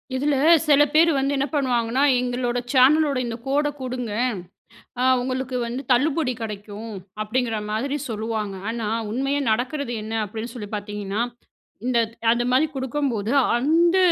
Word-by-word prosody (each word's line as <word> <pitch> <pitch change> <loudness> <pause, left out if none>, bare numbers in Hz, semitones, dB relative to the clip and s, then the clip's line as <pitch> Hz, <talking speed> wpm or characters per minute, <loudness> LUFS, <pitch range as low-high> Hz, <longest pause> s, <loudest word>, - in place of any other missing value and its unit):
இதில 285 +2 +1 0.3
சில 290 -1 +6
பேர் 330 +2 +5
வந்து 275 +1 +1
என்ன 275 +1 0
பண்ணுவாங்கன்னா. 250 -2 +1 0.2
"எங்களோட 245 -1 -1 0.2
சேனலோட 280 +2 +5
இந்த 235 -1 -4
கோட 290 +2 +2
குடுங்க. 250 -3 -4 0.9
அ - - +2 0.2
உங்களுக்கு 255 0 -3
வந்து 245 +3 -4
தள்ளுபடி 285 +2 +2
கடைக்கும்." 210 +1 -6 0.3
அப்படிங்கிற 230 +1 -1
மாதிரி 265 +7 -1
சொல்லுவாங்க. 215 -2 -3 0.2
ஆனா, 230 -2 -3 0.2
உண்மையா 275 +5 0
நடக்கிறது 250 +3 -1
என்ன 220 +1 -6
அப்படின்னு 220 +3 -6
சொல்லி 210 -4 -7
பார்த்தீங்கன்னா. 205 +1 -3 0.6
இந்தத் 235 -3 +1 0.2
அந்த 240 +1 +1
மாரி 260 +5 +4
குடுக்கும்போது 260 -5 -2 0.2
அந்த 330 +8 +3
250 Hz, 130 wpm, -23 LUFS, 225-275 Hz, 0.9 s, சில